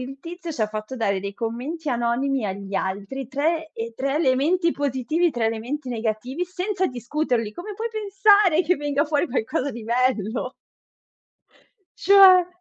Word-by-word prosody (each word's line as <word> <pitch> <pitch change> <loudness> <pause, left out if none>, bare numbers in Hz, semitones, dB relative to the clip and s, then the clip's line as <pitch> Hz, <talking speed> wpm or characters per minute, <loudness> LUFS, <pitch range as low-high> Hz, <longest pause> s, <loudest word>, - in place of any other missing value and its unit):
il 270 +2 -8
tizio 340 +1 -7
ci 240 - -2
ha - - +2
fatto 215 +3 -6
dare 200 -4 0
dei 200 +1 -5
commenti 250 +9 -4
anonimi 240 +1 0
agli 195 +1 -6
altri, 200 +8 -3
3, 315 +4 -1
ehm, 230 +1 -5
3 275 +1 -1
elementi 320 +4 +2
positivi, 285 +5 0
3 230 -2 0
elementi 250 +5 -3
negativi, 235 +7 -2
senza 375 +1 -1
discuterli. 245 -4 -2
Come 405 - -7
puoi 455 +3 -3
pensare 405 -4 +4
che 355 +2 +1
venga 290 0 0
fuori 300 +1 0
qualcosa 275 +2 -1
di 235 - -8
bello? 240 0 0 1.5
Cioè. 380 -3 +7
275 Hz, 150 wpm, -23 LUFS, 230-340 Hz, 1.5 s, Cioè